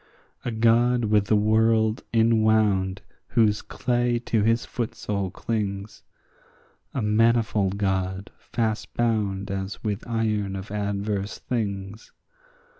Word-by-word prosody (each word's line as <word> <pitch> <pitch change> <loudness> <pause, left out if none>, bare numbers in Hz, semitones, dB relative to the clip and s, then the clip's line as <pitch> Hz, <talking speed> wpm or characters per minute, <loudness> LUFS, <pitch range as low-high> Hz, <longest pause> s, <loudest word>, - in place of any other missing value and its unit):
A - - -2
God 120 +1 +3
with 105 -1 +3
the 110 - +2
world 110 +1 +3
inwound 110 -4 +2 0.2
whose 110 -3 +2
clay 120 -1 0
to 110 - +1
his 115 +2 +2
footsole 100 -5 -3
clings; 100 -2 -3 0.9
A 130 - -1
manifold 105 -2 +2
God 95 0 -1
fast 110 -2 -2
bound 105 -4 0
as 95 +1 -4
with 105 -1 -2
iron 110 -4 -1
of 95 +1 -7
adverse 100 0 -2
things. 100 -3 -4
105 Hz, 110 wpm, -25 LUFS, 100-115 Hz, 0.9 s, God